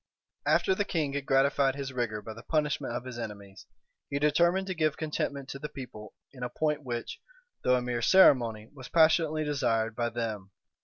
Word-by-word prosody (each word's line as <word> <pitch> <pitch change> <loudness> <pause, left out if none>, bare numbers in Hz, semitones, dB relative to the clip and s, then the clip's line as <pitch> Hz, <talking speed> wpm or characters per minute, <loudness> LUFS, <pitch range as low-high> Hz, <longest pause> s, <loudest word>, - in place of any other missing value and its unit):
After 190 - +3
the 205 - 0
king 155 -8 -1
had 140 -1 -4
gratified 135 0 +3
his 140 -1 -5
rigor 110 -4 -2
by 110 - -7
the 115 - -11
punishment 150 -2 -1
of 120 +1 -4
his 125 -2 -7
enemies, 100 -4 -8 0.4
he 140 - -1
determined 170 +6 +3
to 190 - -3
give 155 -3 0
contentment 145 -3 -3
to 140 - -6
the 150 +1 -5
people 110 -6 -10 0.2
in 125 - -13
a 125 - -2
point 150 +3 -1
which, 120 -3 -5 0.4
though 125 - +4
a 125 - 0
mere 120 -1 -2
ceremony, 115 - +4
was 130 -3 -10
passionately 160 -1 +3
desired 115 -7 0
by 120 0 0
them. 110 -4 -4
135 Hz, 190 wpm, -29 LUFS, 115-150 Hz, 0.4 s, though